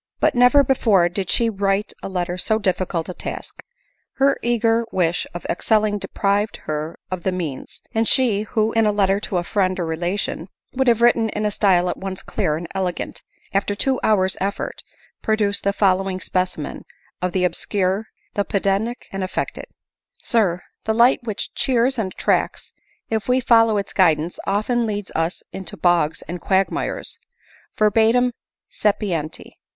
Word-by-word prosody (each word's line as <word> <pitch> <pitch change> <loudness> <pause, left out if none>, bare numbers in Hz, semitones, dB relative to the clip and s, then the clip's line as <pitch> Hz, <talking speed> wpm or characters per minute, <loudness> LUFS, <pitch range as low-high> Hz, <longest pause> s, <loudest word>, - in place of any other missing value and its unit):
But - - +3
never 250 +3 +6
before 215 -9 +3
did 185 +1 -3
she 235 - +3
find 205 -3 -5
writing 195 +1 +1
a - - -5
letter 180 -1 -2
so 215 +4 +1
difficult 185 -5 -1
a 180 - -5
task. - - -6 0.5
Her 275 +1 +2
eager 230 -1 +2
wish 175 -2 0
of 175 - -8
excelling 210 +2 +1
deprived 200 +2 0
her 155 +1 -3
of 185 -1 -3
the 190 - 0
means; 165 -8 -5
and 225 0 +1
she, 235 -6 +3
who, 215 0 0
in 225 -1 +3
a - - +3
letter 200 -1 +2
to 205 -2 -3
a 175 - 0
friend 185 0 0
or 175 - -1
relation, 175 +2 -2 0.3
would 265 0 0
have 235 -1 +4
written 230 -2 +4
in 210 0 -2
a 210 - +1
style 185 -4 +3
at 175 - -2
once 190 -1 -6
clear 150 - -1
and 170 +1 -6
elegant, 185 -2 -3 0.3
after 200 +1 0
two 260 +5 0
hour's 190 -3 +2
effort 200 +1 -3 0.4
produced 210 -2 0
the 200 - +2
following 195 -1 +1
specimen 185 -5 -2 0.4
of 180 0 0
the 185 0 0
obscure, 190 +3 0 0.3
the 205 - +1
pedantic, 200 +5 -1
and 195 -1 -3
affected; 185 - -3 0.3
" - - -45
SIR, 190 -7 +1
" - - -56
The 220 - +1
light 240 +3 +5
which 215 -3 -4
cheers 255 0 +1
and 190 -4 -1
attracts, - - -1 0.4
if 220 -1 -1
we 250 +1 +3
follow 225 -3 +4
its 200 - -3
guidance, 165 -2 +2
often 225 +4 +1
leads 205 -2 -4
us 165 +2 -1
into 190 -3 -7
bogs 165 -2 +2
and 175 +1 -6
quagmires;. 195 - -1 0.6
Verbum 225 +4 +4 0.4
sapienti. 185 -7 -2
200 Hz, 165 wpm, -21 LUFS, 180-220 Hz, 0.6 s, never